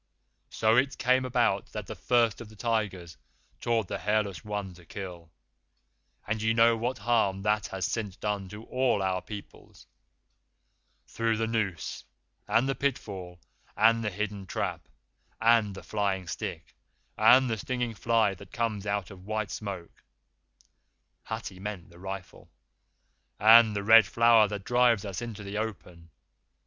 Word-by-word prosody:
So 110 +1 +2
it 135 +2 +2
came 130 +1 +2
about 120 -6 0
that - - -5
the - - -6
First 120 -3 +1
of 115 - -9
the 110 - -15
Tigers 100 - -2 0.4
taught 115 -4 0
the - - -4
Hairless 105 -6 -1
One 105 -3 -4
to 90 0 -16
kill 90 -2 -8 1.0
and 110 0 -2
ye 110 +1 +2
know 115 0 +5
what 120 +3 -2
harm 105 -3 +1
that 105 0 +1
has 95 -1 -3
since 105 -5 -3
done 100 -2 -3
to 105 +3 -9
all 125 -5 0
our 95 -1 0
peoples 105 -2 -11 1.2
through 115 -1 -1
the 115 - 0
noose, 105 -8 -2 0.4
and 120 +3 +2
the 135 - +1
pitfall, 95 -11 -4 0.4
and 115 +1 +4
the 105 - 0
hidden 100 0 -4
trap, - - -3 0.5
and 110 -3 +3
the - - -9
flying 100 -3 -1
stick 80 - -6 0.4
and 130 +1 +6
the 110 -2 -1
stinging 125 +1 -2
fly 110 -2 +2
that 95 0 -13
comes 110 -3 -2
out 100 -1 -2
of 95 0 -13
white 110 -2 -2
smoke 95 -5 -7 1.2
[Hathi 110 -4 -6
meant 95 -3 -6
the 85 - -16
rifle], 95 0 -8 0.9
and 110 0 +7
the 100 - -2
Red 110 -1 +7
Flower 115 0 +5
that 100 -1 -5
drives 120 -3 +3
us 95 -3 -5
into 110 -3 -6
the 100 +1 -4
open. 90 -6 -6
105 Hz, 150 wpm, -28 LUFS, 95-115 Hz, 1.2 s, and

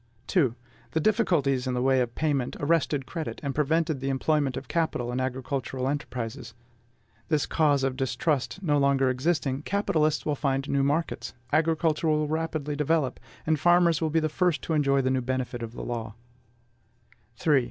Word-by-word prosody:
2. 135 - +2 0.4
The 160 - +2
difficulties 150 - +2
in 125 - -1
the 125 - 0
way 130 -1 +3
of 120 -1 -3
payment 145 -5 0
arrested 145 -2 +1
credit, 160 +3 -5
and 140 -1 -2
prevented 155 0 +1
the 135 +1 -2
employment 135 0 +1
of - - -6
capital 155 -8 -1
in 125 - -2
agricultural 130 0 -2
enterprises. 125 -4 -4 0.7
This 155 -3 +1
cause 145 -4 +2
of 135 -1 0
distrust 145 +6 -1
no 145 -4 +2
longer 135 -2 +3
existing, 135 0 0
capitalists 155 -5 0
will 150 - +1
find 135 -1 -1
new 140 -1 +1
markets, 145 +4 -1 0.2
agriculture 160 0 +2
will 155 -1 +2
rapidly 155 -2 -2
develop, 150 -2 0 0.3
and 155 -1 +1
farmers 175 -1 +4
will 160 - +1
be 160 +1 +2
the 155 - +1
first 170 +1 0
to 165 - -2
enjoy 140 -3 +2
the 130 - +1
benefit 125 -1 -3
of 115 0 -6
the - - -7
new - - -6
law. 115 -3 -4 1.2
3. 145 +3 +3
145 Hz, 170 wpm, -27 LUFS, 130-160 Hz, 1.2 s, farmers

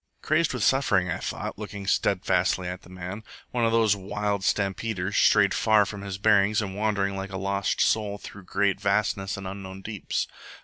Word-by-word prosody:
Crazed 155 +1 +2
with 125 -4 -2
suffering, 100 -10 +3
I - - -2
thought, - - -5
looking 105 -2 -6
steadfastly 95 -1 +1
at 90 0 -5
the - - -17
man 90 +3 -7 0.3
one 120 -2 +1
of 115 - +2
those 110 -3 +4
wild 100 +1 -2
stampeders, 100 0 -1
strayed 105 -2 +5
far 110 -2 +4
from 100 0 -7
his 100 -1 -5
bearings 105 0 +4
and 100 -3 -3
wandering 100 -2 0
like 95 0 -5
a 95 - -4
lost 100 0 -1
soul 105 -2 +1
through 100 -2 -11
great 95 +1 0
vastnesses 100 -1 0
and 100 - -7
unknown 95 0 -7
deeps. 105 -3 -3
100 Hz, 180 wpm, -26 LUFS, 95-105 Hz, 0.3 s, strayed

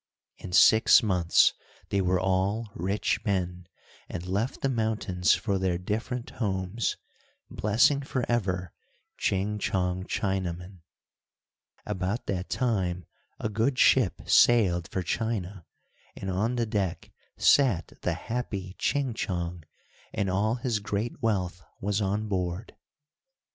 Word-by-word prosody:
In - - -8
six 110 +6 +6
months 90 -5 +4 0.4
they 100 - +1
were 90 0 +2
all 95 +4 0
rich 95 +4 -1
men, 90 -4 -2 0.4
and 85 - -5
left 100 +7 -2
the - - +1
mountains 110 - +1
for 100 -4 -1
their 95 -2 0
different 115 +7 -3
homes, 95 +1 -1 0.5
blessing 120 +7 +3
forever 105 - -1 0.5
Ching 100 +2 0
Chong 90 -2 -1
Chinaman. 95 -2 -3 1.1
About 105 +4 -2
that 90 -1 -3
time 95 -8 -1 0.3
a - - -1
good 115 +5 0
ship 125 -9 +4
sailed 95 -8 +4
for 95 - -3
China, 100 -3 -3 0.5
and 95 - -4
on 110 +7 0
the 120 -1 0
deck 100 -5 -2 0.3
sat 120 - +3
the - - 0
happy 100 -6 -4
Ching 140 -4 0
Chong, 85 -5 -3 0.5
and 100 -3 0
all 105 +5 +1
his 120 -3 -1
great 105 +3 -3
wealth 90 -5 -1 0.2
was 100 +2 -1
on 105 +2 -1
board. 90 +1 -3
100 Hz, 120 wpm, -27 LUFS, 90-110 Hz, 1.1 s, six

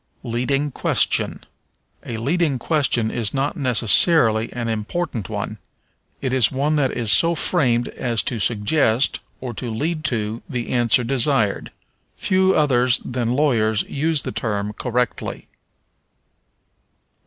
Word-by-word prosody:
Leading 135 +5 -1
Question. - - +1 0.6
A 115 - -5
leading 145 +4 0
question 125 -5 0
is 115 0 -3
not 140 +4 -1
necessarily 120 - +3
an 120 -1 -4
important 115 - -3
one; - - -5 0.6
it 130 -1 -2
is 125 -5 +3
one 145 +3 0
that 135 -3 +2
is 115 -4 -1
so 170 0 +4
framed 125 -8 +1
as 115 -3 -2
to 120 -5 -3
suggest, 115 - +1 0.2
or 125 -2 -5
lead 150 +7 -3
to, 110 -1 -1
the 125 -4 -4
answer 120 0 +2
desired. 125 -3 +1 0.5
Few 190 0 +2
others 125 -5 +3
than 120 -1 -2
lawyers 110 -7 +1
use 155 +1 -1
the - - -4
term 105 -3 -3
correctly. 125 0 -3
125 Hz, 120 wpm, -21 LUFS, 115-145 Hz, 0.6 s, so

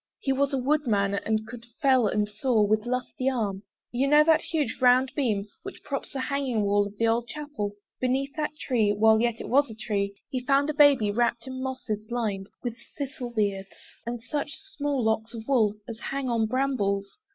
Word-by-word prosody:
He 270 - 0
was 275 +1 +1
a 275 - 0
woodman, 245 -8 +1
and 215 +2 -1
could 235 0 -10
fell 260 -5 +4
and 210 +1 +1
saw 215 +2 +1
With 215 +2 +1
lusty 255 +1 -1
arm. 210 -7 -2 0.3
You 255 +3 +1
know 295 +1 +7
that 315 0 +4
huge 300 -8 -2
round 255 +1 +5
beam 215 -8 0
Which 385 +1 -9
props 275 -1 -4
the 270 - -2
hanging 265 -5 -1
wall 205 0 +2
of 205 0 -13
the 230 - +1
old 230 +1 +1
chapel? 290 -9 -5 0.2
Beneath 265 +2 0
that 305 -1 -2
tree, 235 -8 +1
while 220 +1 +4
yet 235 -1 0
it - - -6
was 280 +2 +3
a 220 - -8
tree 205 -3 -2 0.2
He 255 - -1
found 280 +3 +3
a - - -7
baby 285 -8 +5
wrapt 235 +1 0
in 260 0 -6
mosses, 230 -5 -4
lined 210 -5 -2
With 240 -2 -3 0.2
thistle 265 -3 -4
beards, 200 -4 -2 0.3
and 235 0 -5
such 295 +3 -3
small 290 -9 -3
locks 220 +1 0
of 225 -1 -8
wool 220 -7 +3
As 230 -1 -7
hang 275 -1 -3
on 230 -2 +1
brambles. 210 - -1
240 Hz, 195 wpm, -27 LUFS, 215-275 Hz, 0.3 s, know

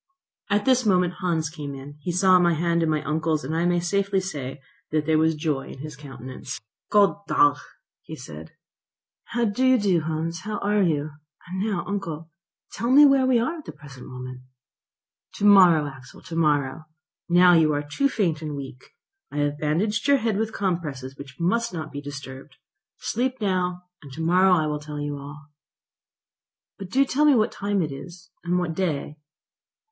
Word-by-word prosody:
At 205 0 +1
this 255 -1 +4
moment 180 -4 +2
Hans 165 -4 0
came, 145 -3 -6 0.3
he 175 - -2
saw 185 +1 +5
my 175 -1 +3
hand 170 +1 +1
in 165 - +1
my 155 -2 0
uncle's, 155 +1 -1
and 155 +5 -3
I 165 +1 +1
may 175 0 +2
safely 195 +2 0
say 145 -8 -5 0.3
that 155 -1 0
there 155 0 +3
was 160 0 +2
joy 150 -3 -2
in - - -9
his 150 +2 -8
countenance. 135 -3 -8 0.3
"God 205 -2 +4
dag," 145 0 +4 0.6
said 75 +2 -10
he. - - -33 0.7
"How 235 0 -1
do 210 +4 -1
you 260 0 +5
do, 195 -6 +2
Hans? 160 +1 -3
How 210 +4 -4
are 205 +1 +1
you? 155 -4 0 0.3
And 185 +1 -5
now, 200 -3 -1
uncle, 165 -5 -5 0.4
tell 235 +4 -3
me 285 +3 +8
where 275 -2 +4
we 255 -2 +4
are 290 +9 -1
at 305 - -12
the - - -7
present 135 -4 -13
moment?" 125 0 -8 0.9
"To 205 - -1
morrow, 180 -7 +7
Axel, 135 -3 -11
to 170 - -8
morrow. 150 -2 +1 0.4
Now 180 +1 +6
you 160 -2 +4
are 145 0 -1
too 275 - 0
faint 170 - 0
and 150 -2 -4
weak. 135 - -10 0.4
I - - -6
have 145 0 0
bandaged 195 - 0
your 280 0 +5
head 225 -4 -1
with 220 +2 -1
compresses 150 -10 -3
which 140 +1 -12
must 230 +6 0
not 155 -3 -5
be 145 0 -6
disturbed. 135 -1 -9 0.4
Sleep 255 +3 -2
now, 180 -3 -1 0.2
and 140 -4 -12
to 160 - -6
morrow 180 +3 +4
I 160 -3 +1
will 150 -1 -2
tell 150 0 -7
you 145 -1 -4
all." 145 +2 -10 1.3
"But 195 -2 -7
do 270 +6 +3
tell 290 +3 +1
me 295 -2 +6
what 220 0 +2
time 200 -2 -1
it 150 - -4
is, 170 +5 -10
and 175 +1 0
what 175 -2 -1
day." 155 -4 -2
170 Hz, 185 wpm, -24 LUFS, 150-200 Hz, 1.3 s, me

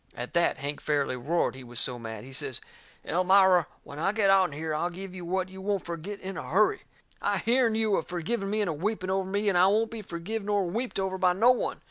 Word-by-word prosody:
At 120 +1 -6
that 170 - +2
Hank 145 +1 -4
fairly 145 -3 0
roared, 150 +8 0
he 130 0 -10
was 120 -1 -6
so 125 -2 -1
mad. 110 -2 -7
He 135 - -11
says: 130 -2 -3 0.5
"Elmira, 185 -1 +4 0.2
when 145 - -9
I 195 - +2
get 205 -3 +3
out'n 190 -4 +4
here 155 +2 -3
I'll 165 +3 0
give 185 +1 -8
you 185 -1 -7
what 185 +2 -1
you 190 0 -10
won't 200 -1 -1
fergit 170 +4 -6
in 190 0 -6
a - - -7
hurry. 210 +5 +3 0.4
I - - +1
hearn 235 -1 +2
you 220 -2 +2
a - - +1
forgiving 195 +4 -3
me 215 +1 0
and 205 - 0
a - - -2
weeping 185 +3 -2
over 190 0 -1
me, 205 +2 0
and 195 - +3
I 185 - +6
won't 220 +3 +2
be 225 -1 -6
forgive 195 +4 -5
nor 205 -1 +1
weeped 230 +8 -3
over 190 -1 -2
by 180 -1 +4
no 225 +7 +5
one! 250 - -1
185 Hz, 245 wpm, -28 LUFS, 160-205 Hz, 0.5 s, I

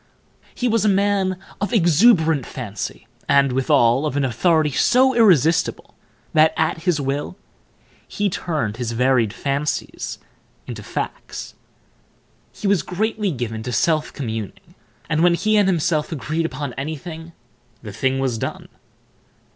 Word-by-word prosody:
He 250 - -1
was 230 -3 +2
a 215 - +3
man 195 -1 +1 0.2
of 200 - -1
exuberant 165 - +4
fancy, 105 -7 -6 0.2
and, 140 -1 +4
withal, 130 +1 +3
of 145 - -3
an 140 - +1
authority 155 +4 +2
so 260 - +3
irresistible 170 - +3 0.4
that, 155 +1 +4
at 160 +1 -1
his 175 -5 +2
will, 140 +6 -3 0.7
he 205 - -1
turned 155 - -2
his 120 -2 -3
varied 125 -2 +2
fancies 140 +5 -3 0.5
into - - -7
facts. - - -6 1.0
He - - -10
was 200 -4 +3
greatly 210 +4 -1
given 120 -7 -4
to 125 - -5
self 155 +3 +1
communing, 110 -7 -6 0.3
and, 155 +1 0
when 175 0 +5
he 215 +4 +1
and 205 -2 +4
himself 165 -3 0
agreed 160 +3 -2
upon 135 -2 -5
anything, 160 +4 -6 0.5
the 105 -3 -8
thing 130 +5 0
was 130 -4 -1
done. - - -5
155 Hz, 135 wpm, -21 LUFS, 130-185 Hz, 1.0 s, when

